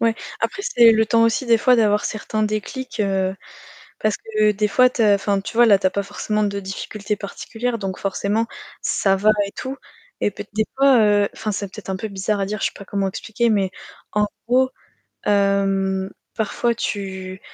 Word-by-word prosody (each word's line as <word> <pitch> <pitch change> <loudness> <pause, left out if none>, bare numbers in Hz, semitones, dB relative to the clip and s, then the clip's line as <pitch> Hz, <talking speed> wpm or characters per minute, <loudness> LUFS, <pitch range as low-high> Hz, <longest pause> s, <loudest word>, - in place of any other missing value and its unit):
Ouais. 230 -1 +2 0.3
Après 395 +1 -2
c'est 235 - +6
le 220 0 +3
temps 230 +1 +3
aussi 230 +3 +2
des 230 -1 +5
fois 250 +2 +4
d'avoir 210 -2 +3
certains 215 0 -2
déclics, 215 +5 -3
heu, 195 -2 0 0.6
parce 215 -1 +1
que 215 -1 +1
des 210 +1 +1
fois 250 +4 +4
tu 235 - -1
as 205 -2 +6
enfin 200 0 0
tu 210 - -7
vois 240 - +7
là 200 -3 +6
tu 190 - 0
as 185 - +3
pas 200 - -1
forcément 210 +2 -2
de 200 -1 -1
difficultés 200 +1 -4
particulières, 230 +4 -4
donc 190 -2 -4
forcément 200 +3 -1 0.4
ça 195 -1 +2
va 205 +3 +3 0.2
et 200 - -9
tout. 265 +1 -5 0.4
Et - - +2
peut 205 - -8
des 220 - +2
fois, 275 -3 +6
heu 205 -1 +4
enfin, 215 - -3
c'est 200 0 -3
peut-être 195 -2 -8
un 190 - -1
peu 220 +3 -5
bizarre 200 +1 -2
à 195 - 0
dire, 210 +1 -4
je - - +1
sais - - -13
pas 200 - -11
comment 200 0 -1
expliquer, 225 +4 -1
mais 195 -3 +1 0.4
en 210 0 +2 0.2
gros, 260 +1 +3 0.6
hem, 195 -1 +1 0.3
parfois 235 +2 0
tu 190 -3 -4
210 Hz, 200 wpm, -21 LUFS, 195-225 Hz, 0.6 s, vois